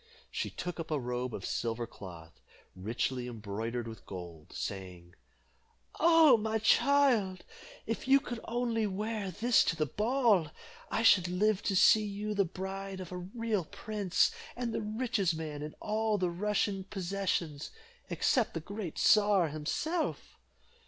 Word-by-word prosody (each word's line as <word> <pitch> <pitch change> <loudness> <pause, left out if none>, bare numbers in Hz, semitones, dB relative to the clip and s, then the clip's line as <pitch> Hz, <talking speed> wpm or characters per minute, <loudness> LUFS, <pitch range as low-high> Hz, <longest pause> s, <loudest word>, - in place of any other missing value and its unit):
She - - -2
took 180 -1 -5
up 165 - -5
a 155 -2 0
robe 125 0 -3
of 100 -4 -6
silver 115 0 -2
cloth, 85 -7 -12 0.3
richly 120 +6 -2
embroidered 115 +1 -4
with 110 -1 -10
gold, 85 -4 -9
saying, 90 -3 -6 0.9
"Oh! 325 -5 +7
my 220 0 -1
child, 230 -5 +3 0.4
if 225 +3 -3
you 275 +1 +7
could 240 -4 -6
only 230 -2 0
wear 210 +1 -3
this 225 +7 +3
to 165 - +1
the 155 -2 0
ball, 215 - +2 0.4
I 225 - 0
should 185 -5 +6
live 195 +3 +1
to 195 - 0
see 215 +3 +6
you 210 +1 -3
the 200 -1 +2
bride 190 +2 -5
of 185 -2 -7
a 180 - -4
real 205 +1 -2
prince, 205 0 0 0.2
and 240 -2 -3
the - - -1
richest 215 -5 0
man 155 -2 -5
in 150 +1 -6
all 215 0 0
the 180 -2 0
Russian 200 +1 0
possessions, 185 -6 -2 0.4
except 245 - +1
the - - -1
great 195 0 -6
czar 205 -5 +4
himself." 305 - -2
190 Hz, 145 wpm, -31 LUFS, 150-220 Hz, 0.9 s, Oh